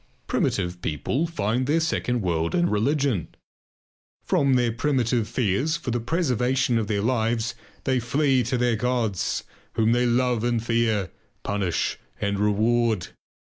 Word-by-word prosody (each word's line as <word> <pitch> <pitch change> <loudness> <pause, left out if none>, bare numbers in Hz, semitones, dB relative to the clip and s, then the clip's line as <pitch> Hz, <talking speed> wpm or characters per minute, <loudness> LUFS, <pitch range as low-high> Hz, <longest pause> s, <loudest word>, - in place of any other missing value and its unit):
Primitive 90 -2 -1
people 125 - -1
find 125 -4 -1
their 155 +3 +3
second 125 -8 -1
world 85 -2 0
in 175 0 +3
religion. 125 - +1 1.0
From 135 -2 +2
their 120 -2 +2
primitive 120 -2 0
fears 130 - 0
for 145 -6 -4
the 120 - 0
preservation 130 -3 +1
of 110 - -2
their 100 -1 0
lives 115 -1 0 0.3
they 130 -1 +1
flee 130 +2 +2
to 125 +2 0
their 120 -1 +2
gods, 115 -5 -1 0.3
whom 110 0 +2
they 120 +1 +3
love 120 -1 +1
and 120 -1 0
fear, 115 -5 +1 0.3
punish 100 -4 -1 0.2
and 100 -1 -1
reward. 110 0 +1
120 Hz, 140 wpm, -25 LUFS, 105-130 Hz, 1.0 s, their